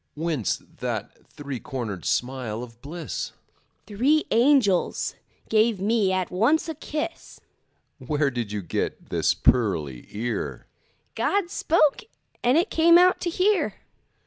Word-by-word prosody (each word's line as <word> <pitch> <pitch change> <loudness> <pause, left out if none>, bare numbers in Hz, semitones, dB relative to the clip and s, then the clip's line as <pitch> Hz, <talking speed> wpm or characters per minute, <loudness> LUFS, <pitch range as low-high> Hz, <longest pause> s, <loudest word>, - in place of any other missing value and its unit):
Whence 155 - -1
that - - -6
three 140 -3 -7
cornered 110 -10 -5
smile 125 -3 -2
of 115 -1 -13
bliss? 155 +2 -5 0.5
Three 255 - +2
angels 235 -6 +3 0.3
gave 220 -1 +2
me 205 -1 +2
at 185 -1 -1
once 235 - +2
a 320 - -3
kiss. 310 +2 -5 0.6
Where 145 +2 0
did 120 -4 -4
you 105 -2 -3
get 85 - -3
this - - +2
pearly 80 - +1
ear? 115 +4 -4 0.5
God 395 -3 0
spoke, 310 - +2 0.4
and 250 +4 +4
it 350 +6 +1
came 335 +1 +6
out 365 +1 +4
to 345 - -1
hear. 385 +4 +1
185 Hz, 125 wpm, -25 LUFS, -, 0.6 s, came